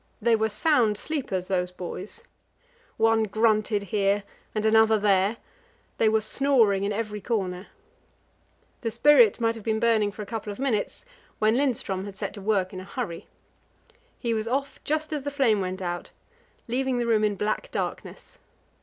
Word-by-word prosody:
They 230 0 +3
were 220 0 +1
sound 225 -3 +2
sleepers, 245 - -3
those 180 -1 -1
boys. 185 - -7 0.7
One 225 0 +3
grunted 215 -1 +1
here 200 +1 +1 0.3
and 215 0 -1
another 220 0 +5
there; 200 +1 +2 0.6
they 220 - +4
were 220 0 +2
snoring 220 -4 +2
in 200 - 0
every 210 -1 -3
corner. 190 -4 -2 1.1
The 230 - -1
spirit 235 -1 +5
might 230 -1 +1
have 225 -2 -10
been 220 0 0
burning 220 -3 +2
for 210 - -7
a - - -9
couple 215 -1 -5
of 200 - -7
minutes, 260 - -1 0.3
when 215 +1 +3
Lindström 230 -8 0
had 200 -1 -8
to - - -16
set - - -4
to 205 - -9
work 195 -2 0
in 185 - -6
a - - -8
hurry. 190 -5 -5 0.9
He 235 -2 -1
was 220 0 -2
off 275 +3 -2
just 310 +1 -1
as 295 - -2
the 285 - -3
flame 260 -8 +2
went 185 0 -4
out, 175 0 -4 0.6
leaving 255 +1 0
the 240 - 0
room 220 -2 +2
in 210 -1 +1
black 215 - -2
darkness. - - -6
220 Hz, 170 wpm, -26 LUFS, 200-235 Hz, 1.1 s, another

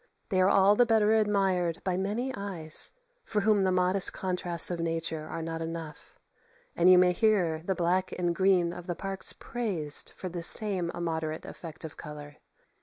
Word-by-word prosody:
They 185 -4 +2
are 185 - +4
all 200 +1 +5
the 245 - +5
better 220 -2 +3
admired 195 -5 +1
by 185 -1 -1
many 210 +8 -2
eyes, 185 -7 -2 0.3
for 210 - -1
whom 210 0 +3
the 185 - +2
modest 185 +1 +2
contrasts 180 -2 0
of 175 - -3
nature 165 -1 -3
are 165 - -5
not 165 0 -4
enough; 165 -2 -7 0.6
and 175 +2 +4
you 185 - +8
may 180 0 +5
hear 180 -5 +1
the 190 +2 -1
black 180 +2 0
and 175 -1 0
green 180 -2 +2
of 175 0 -9
the 175 - -2
parks 195 +1 -2
praised 185 -12 -4
for 185 - -8
this 175 -1 +2
same 190 -5 +1
immoderate 160 -2 -3
effect 165 -1 -9
of 155 - -9
colour. 150 -1 -9
180 Hz, 180 wpm, -29 LUFS, 165-195 Hz, 0.6 s, you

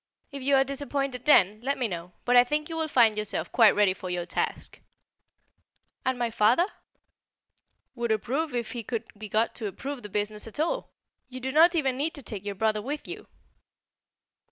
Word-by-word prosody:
"If 280 -1 -7
you 275 +2 +3
are 270 - +5
disappointed 275 -2 -3
then, 215 -7 +5
let 280 +3 -1
me 250 - 0
know. 175 -2 -7
But 245 - +3
I 245 - +9
think 300 +5 -2
you 325 - -4
will 320 -1 -1
find 235 -7 +4
yourself 210 -1 -3
quite 225 -4 +6
ready 205 -2 +4
for 185 -1 -8
your 175 -1 -2
task." - - -3 1.2
"And 260 -1 0
my 240 -1 -1
father?" 230 +9 +4 1.3
"Would 235 -3 -2
approve 265 +7 -1
if 235 -2 -2
he 240 - -4
could 230 +1 -3
be 215 0 -8
got 220 +3 +1
to 220 - -4
approve 265 +7 -6
the 210 - -9
business 210 +2 -3
at 225 - -7
all. 340 +11 -1 0.4
You 255 0 -7
do 260 +1 -3
not 330 +5 +6
even 270 -5 +1
need 315 +5 -1
to 285 - -8
take 205 -5 -4
your 205 -1 -4
brother 215 +1 0
with 285 +6 -5
you." 390 +4 -8
245 Hz, 195 wpm, -27 LUFS, 215-280 Hz, 1.3 s, I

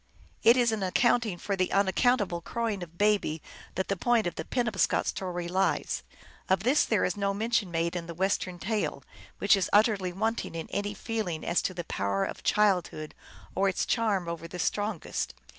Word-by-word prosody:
It 235 +2 +6
is 240 -2 +4
in 220 -2 -2
accounting 215 +1 +2
for 200 +3 -2
the 185 -1 0
unaccountable 200 -2 +2
crowing 225 +1 -2
of 170 -1 -9
Baby 205 -6 +2 0.4
that 190 - -1
the 200 - 0
point 235 +4 +2
of 175 - -1
the - - -5
Penob 240 -5 -1
scot - - +3
story 175 -2 -3
lies. 190 +2 0 0.5
Of 190 +1 +2
this 265 +6 +4
there 215 -4 +2
is 180 - -1
no 200 -1 0
mention 220 -2 0
made 170 +1 -1
in 170 -2 -4
the 170 - -7
Western 185 0 0
tale, 215 +3 -2 0.3
which - - +5
is 190 -3 0
utterly 205 -3 +3
wanting 220 0 -2
in 165 - -4
any 205 0 -2
feeling 210 -8 -3
as 170 - +2
to 185 - -3
the 175 - -3
power 100 -8 -1
of - - -6
childhood 185 -7 +1 0.4
or 195 +1 +2
its 185 - -1
charm 210 -7 +1
over 170 0 -5
the 175 - -8
strongest. 205 - -2
195 Hz, 190 wpm, -28 LUFS, 175-220 Hz, 0.5 s, It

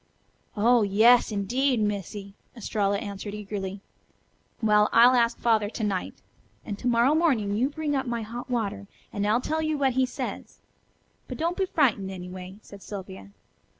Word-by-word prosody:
"Oh, 235 +3 +4
yas 220 +4 +5
indeed, 245 +6 0
Missy," 205 -1 -3 0.2
Estralla 200 -3 0
answered 205 0 -6
eagerly. 200 -2 -5 0.8
"Well, 210 -2 +3
I'll 240 +2 +7
ask 235 -1 +2
Father 220 -3 +2
to 220 - -5
night. 195 -3 -3 0.4
And 205 -2 -5
to - - -3
morrow 240 +4 +3
morning 260 -12 +1
you 250 +6 +1
bring 300 -1 -2
up 265 -1 -1
my 235 -1 -2
hot 240 +4 -7
water, 210 -4 -2 0.3
and 205 0 -1
I'll 225 +4 +2
tell 315 +4 -1
you 310 -1 -1
what 270 -2 +1
he 260 0 +2
says. - - -6 0.7
But - - -6
don't 335 +3 -1
be 380 0 -1
frightened, 235 - +1
anyway," 185 0 -8
said 200 -1 -13
Sylvia. 190 -1 -9
220 Hz, 160 wpm, -26 LUFS, 200-250 Hz, 0.8 s, I'll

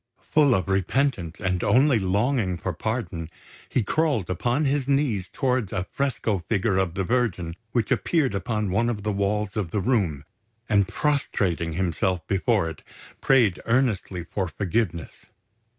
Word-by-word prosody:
Full 145 -5 +5
of 95 - -1
repentance 95 - 0
and 95 -3 -1
only 130 -1 +4
longing 100 0 +1
for 95 +1 -3
pardon, 95 -5 -3 0.4
he 125 - +1
crawled 140 - 0
upon 120 - 0
his 140 -1 0
knees 135 -10 +1
towards 125 -6 0
a 95 - -2
fresco 115 -7 0
figure 100 -2 +1
of 95 -3 0
the 95 - 0
Virgin 95 -7 0 0.2
which 120 -4 0
appeared 150 - +1
upon 105 0 -1
one 115 +5 +2
of 105 -4 -3
the 105 - 0
walls 100 0 -1
of 105 -6 -2
the 105 - -1
room, 95 - 0 0.4
and 100 -2 +3
prostrating 95 - 0
himself 90 +1 -1
before 100 -1 +1
it, 80 - -7 0.4
prayed 120 -9 +4
earnestly 115 -7 +1
for 95 +1 -3
forgiveness. 90 - -3
105 Hz, 150 wpm, -25 LUFS, 90-125 Hz, 0.4 s, Full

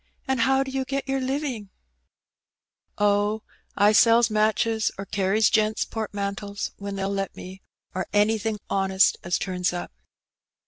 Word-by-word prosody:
^* - - -43 0.2
And 265 -1 0
how 265 +2 +3
do 265 - -7
you 265 0 -1
get 275 +1 -3
your 270 0 0
living? 260 -6 -3 0.7
" - - -68 0.5
Oh, 205 +1 +1 0.3
I 205 +1 +5
sells 230 +1 +5
matches 220 +1 +1
or 195 - -5
carries 200 +2 +2
gents* 215 0 +2
portmantles 200 -2 -4
when 200 0 -5
they^U 195 0 -2
let 195 -1 -3
me, 190 +1 -10 0.3
or 185 -1 -3
anything 215 +1 +1
honest 195 -1 +2
as 175 0 0
turns 180 -2 -1
up.' 175 - -5
210 Hz, 150 wpm, -25 LUFS, 195-230 Hz, 0.7 s, I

